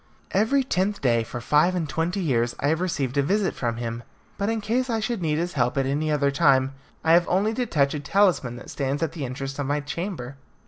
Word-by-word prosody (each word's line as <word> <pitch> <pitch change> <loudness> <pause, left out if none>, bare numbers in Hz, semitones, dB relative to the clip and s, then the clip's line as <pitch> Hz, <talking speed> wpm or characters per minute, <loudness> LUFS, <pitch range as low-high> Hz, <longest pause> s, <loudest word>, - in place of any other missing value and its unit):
Every 225 +8 +2
tenth 200 -4 0
day, 120 -3 +2
for 120 - -6
five 150 +9 +3
and 165 -3 -1
twenty 170 +6 -1
years, 120 -7 +1
I 145 - +1
have 160 +2 +1
received 140 -7 -1
a - - +5
visit 195 +7 +1
from 120 -2 -2
him, 115 0 -4 0.3
but 200 +1 -1
in 225 0 0
case 240 +5 -1
I 225 -1 0
should 220 -1 -2
need 155 -2 0
his 175 +2 -2
help 125 -2 0
at 135 - +2
any 150 +3 0
other 140 -2 +2
time, 135 -1 +3 0.3
I 160 - +3
have 170 +1 +5
only 200 +5 +2
to 245 +1 -1
touch 140 -7 +2
a 150 - -2
talisman 160 -8 +2
that 120 - -10
stands 140 +2 -1
at 160 - -1
the 160 -4 -5
entrance 135 +2 -5
of 140 - -1
my 145 +1 +1
chamber. 145 -3 -5
150 Hz, 235 wpm, -25 LUFS, 135-190 Hz, 0.3 s, a